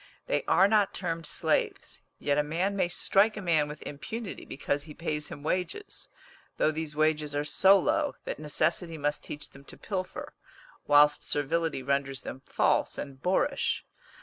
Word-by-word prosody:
They - - 0
are 190 - +5
not 205 -2 +2
termed 165 -3 -3
slaves; - - -1 0.2
yet 145 0 +1
a - - +3
man 175 +7 -1
may 190 - +2
strike 205 +5 +2
a - - -2
man 160 -4 +3
with 150 0 -8
impunity 195 - -6
because 145 +1 -2
he 150 -2 -11
pays 150 -3 -3
him 145 - -9
wages, 185 - -3 0.5
though 155 - +3
these 155 -1 -4
wages 155 -1 +1
are 145 +1 0
so 195 +6 +6
low 300 +6 +1
that - - -4
necessity 160 +2 0
must 145 0 -1
teach 150 - -7
them 135 - -15
to - - -11
pilfer, 185 -3 -5 0.5
whilst 145 0 +5
servility 155 0 0
renders 135 0 -1
them 130 - -7
false - - +1
and 135 -2 -7
boorish. 235 +10 +1
155 Hz, 165 wpm, -29 LUFS, 145-190 Hz, 0.5 s, so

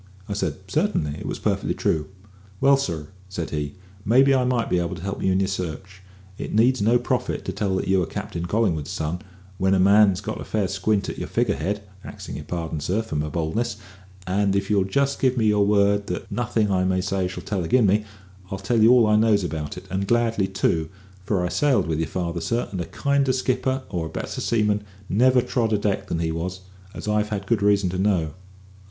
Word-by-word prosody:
I 100 - -3
said, 100 - -1
"Certainly; 75 0 0
it - - -6
was - - -3
perfectly - - -1
true." 75 -1 0 0.5
"Well, 140 0 +6
sir," 85 - -3 0.2
said 85 -3 -4
he, 75 -2 -3 0.3
"maybe 130 +6 +5
I 130 -1 +3
might 125 -2 +1
be 90 - +1
able 85 +1 -2
to 90 - -9
help 100 +1 -4
you 95 - +2
in 95 - +2
your 95 - +1
search. 95 0 -5 0.4
It - - -4
needs 120 +3 +4
no 115 +4 +4
prophet 120 - -2
to - - -2
tell 100 -3 -1
that - - -2
you 95 -1 +3
are 85 - -1
Captain 85 0 -5
Collingwood's 90 -7 0
son, 80 +3 -3 0.4
when 95 +1 +3
a - - +2
man 100 +3 +6
gets - - -8
a - - -3
fair 105 -3 -1
squint 100 +2 0
at - - -5
your - - -4
figure - - +1
head, 100 +6 -2 0.2
axing - - -8
your - - -8
pardon, 80 -3 -3
sir, 95 +9 -1
for 110 - -6
my 75 +1 -1
boldness; 85 +8 -2 0.5
and 100 +1 +1
if 100 +1 -1
you'll 100 -2 +3
just 140 +8 0
give 130 -1 +2
me 110 - +2
your 105 -1 +3
word 100 0 +3
that 90 - -5
nothing 110 -1 0
I 95 -1 +2
may 95 0 +1
say 95 0 -1
shall 90 - -7
tell 95 -4 -2
agin 115 +8 +3
me, 105 +2 +3 0.5
I'll 95 - -3
tell 110 +4 +1
you 110 - +7
all 125 -2 +6
I 105 0 +4
knows 105 -2 +3
about 80 -4 -4
it, - - -9
and 95 +1 -1
gladly 115 -4 +2
too; 85 -5 0 0.4
for 95 -3 0
I - - -1
sailed 140 - +2
with 80 -1 -1
your 80 - 0
father, 85 -1 -3
sir, 115 +8 -1
and 95 -3 -3
a - - -3
kinder 140 - +1
skipper 130 +1 0
or 85 -4 -2
a - - -9
better - - -5
seaman 105 -2 +1 0.2
never 125 +5 +4
trod 115 -3 0
a - - +4
deck 100 -1 -1
than - - -2
he 80 -1 -1
was, 90 +3 -4 0.3
as - - -7
I've 105 0 +1
had 100 -2 -3
good 115 0 +1
reason 100 -3 +3
to 95 - -3
know." 90 -6 +1
100 Hz, 225 wpm, -24 LUFS, 90-110 Hz, 0.5 s, you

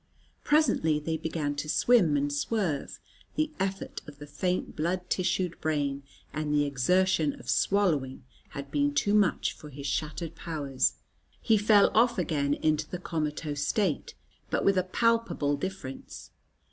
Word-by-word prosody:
Presently 235 - +3
they 160 +2 -2
began 160 -2 -2
to 155 +1 -4
swim 180 -8 +4
and 145 0 -1
swerve; 160 -1 -1 0.4
the 310 0 0
effort 195 0 -3
of 145 -1 -11
the 145 - -9
faint 180 +5 -2
blood 180 +3 -1
tissued 180 -1 0
brain 145 -3 -1 0.3
and 155 -1 -2
the 145 0 +3
exertion 155 +3 +1
of - - -14
swallowing 150 -6 +1 0.3
had 140 0 -8
been 145 0 +1
too 205 +7 +2
much 205 -4 +2
for 150 - -12
his 140 0 -9
shattered 155 +4 -3
powers. 145 -6 -1 0.5
He 225 - +3
fell 210 -1 +5
off 235 +1 +4
again 145 -3 0
into 155 -1 0
the 180 - -4
comatose 150 -3 -3
state, 195 -9 0 0.3
but - - 0
with 195 -1 +4
a - - +1
palpable 230 -7 +1
difference. 145 -4 -7
155 Hz, 145 wpm, -28 LUFS, 145-190 Hz, 0.5 s, fell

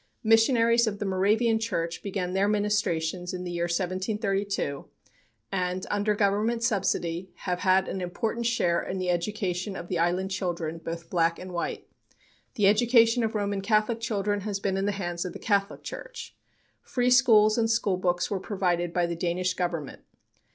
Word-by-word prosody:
Missionaries 230 +1 +4
of 205 -2 -2
the 205 - -4
Moravian 215 +4 +2
Church 170 -7 -2
began 185 -3 -3
their 195 +1 +2
ministrations 185 -4 0
in 180 - -5
the 175 - -5
year 170 0 -1
1732, 195 -2 -2 0.7
and, 185 -1 -2
under 205 +1 +1
Government 215 +3 +1
subsidy, 190 -5 0 0.2
have 180 -2 -1
had 190 0 +3
an 190 - -4
important 225 +6 -2
share 175 -7 +1
in 190 - -4
the 185 -1 0
education 190 +1 -2
of 175 - -7
the 175 - -1
island 180 +3 0
children, 170 -4 -3
both 165 0 -7
black 170 -1 +2
and 185 0 -8
white. 170 - -4 0.7
The 210 -5 +2
education 230 +3 +4
of 220 0 -1
Roman 200 -1 -1
Catholic 215 +3 +1
children 205 -3 -1
has 200 0 -3
been 195 -1 -1
in 195 +1 0
the - - +2
hands 175 -3 -3
of 180 - -5
the - - -6
Catholic 200 -1 0
Church. 475 -1 -8 0.5
Free 250 -1 0
schools 220 -4 +6
and 225 -1 +2
schoolbooks 185 -6 0
were 200 - 0
provided 175 -4 -1
by 175 -1 +2
the 170 0 -3
Danish 180 +2 -1
Government. 175 -6 -3
195 Hz, 165 wpm, -27 LUFS, 180-215 Hz, 0.7 s, schools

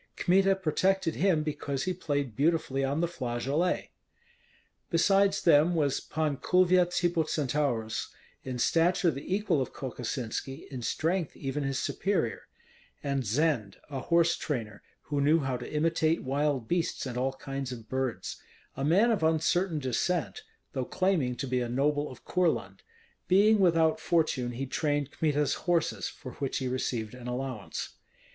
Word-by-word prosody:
Kmita 195 +2 +3
protected 190 0 +1
him 170 -4 +2
because 145 -3 -3
he 185 - -1
played 145 -9 -2
beautifully 145 -3 +1
on 140 +4 0
the 170 - +2
flageolet. 140 +4 -1 1.0
Besides 195 +3 +3
them 165 +1 +5
was 145 -4 +1
Pan 155 -3 -2
Kulvyets 180 +1 +3
Hippocentaurus, 150 -8 0 0.4
in 130 -1 -4
stature 170 +6 +3
the 140 +4 -7
equal 195 -7 +1
of 130 - -4
Kokosinski, 130 +1 -4
in 130 -2 -5
strength 165 +7 -1
even 135 +1 -3
his 135 -1 -1
superior; 185 - -1 0.6
and 140 -2 0
Zend, 120 -3 0
a 135 - -3
horse 170 +4 +3
trainer, 115 -8 -4 0.2
who 145 -1 -1
knew 155 +3 +4
how 135 -2 -1
to 125 - -7
imitate 160 +1 +1
wild 140 -2 0
beasts 175 -3 -1
and 125 -2 -5
all 130 +2 0
kinds 135 -1 -5
of 115 -3 -8
birds, 130 -2 -3 0.3
a 135 - -3
man 195 +11 +4
of 215 - +1
uncertain 160 +2 +2
descent, 150 +6 -1 0.3
though 130 -3 -1
claiming 160 -6 0
to 135 - -4
be 125 -1 0
a 120 - -2
noble 145 +4 +1
of 130 - -13
Courland; 180 -2 0 0.5
being 205 +3 +5
without 165 -4 +3
fortune 155 -8 +1
he 130 +3 -3
trained 145 +1 -1
Kmita's 150 -3 +1 0.2
horses, 170 -2 +1
for 130 - -9
which 135 - -1
he 130 - -2
received 120 -3 -2
an 125 -1 -9
allowance. 130 +1 -4
145 Hz, 150 wpm, -29 LUFS, 130-170 Hz, 1.0 s, them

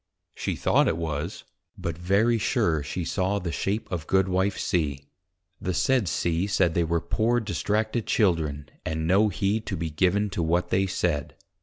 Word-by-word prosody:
_ - - -57 0.4
she - - -1
thought - - +3
it - - +1
was; 80 +1 -4 0.3
but 85 - -3
very 100 +7 +2
sure 105 - +1
she 85 +4 -4
saw 95 +3 0
the 90 -4 -3
shape 100 +6 -2
of 85 -3 -3
Goodwife 95 +1 +2
C. 75 -5 -1 0.6
The 90 -1 -2
said 130 -2 +2
C. 85 +3 0
said, 95 -4 +2
they 85 - +2
were 85 +1 +1
poor 115 +7 +1
distracted 110 +1 -1
Children, 80 -8 +1 0.2
and 80 0 -2
no 100 +5 +4
heed 100 +3 -1
to 95 - -2
be 80 -1 -3
given 95 +6 +1
to 90 - -2
what 85 +2 +1
they 95 +1 +2
said. 75 -6 -1
90 Hz, 175 wpm, -26 LUFS, 80-105 Hz, 0.6 s, no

